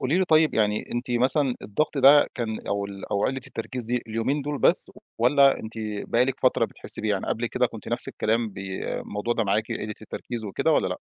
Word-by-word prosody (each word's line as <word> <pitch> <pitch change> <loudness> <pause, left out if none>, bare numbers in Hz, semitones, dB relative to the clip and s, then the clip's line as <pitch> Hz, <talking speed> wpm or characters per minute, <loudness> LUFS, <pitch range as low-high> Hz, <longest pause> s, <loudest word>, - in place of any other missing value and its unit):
قولي 145 +8 +1
لي 190 - +3
طيب 155 -2 +3
يعني 105 -1 +1
أنتِ 120 +1 -3
مثلًا 130 +2 +2
الضغط 140 +7 -1
ده 140 +2 +7
كان 110 -2 -3
أو 100 0 -1
ال 100 -1 -9
أو 100 - +1
قلّة 130 0 -1
التركيز 125 0 -4
دي 120 +2 -2
اليومين 115 +6 -1
دُول 145 0 -3
بس - - +5 0.3
والَّا 135 +3 +4
أنتِ 110 +1 -8 0.4
بقى 120 +2 +4
لِك 135 0 -3
فترة 130 - +3
بتحسي - - -4
بيه 110 - -1
يعني؟ 100 -2 -1
قبل 120 +1 -1
كده - - +1
كنتِ - - -10
نفس - - -1
الكلام 115 +1 0
بي 95 -1 -6 0.2
الموضوع 105 +4 -3
ده 115 - 0
معاكِ 105 +2 0
قلّة 105 0 -4
التركيز 115 +1 -6
وكده 100 - 0
والَّا - - +2
لأ؟ - - -4
120 Hz, 215 wpm, -25 LUFS, 110-135 Hz, 0.4 s, ده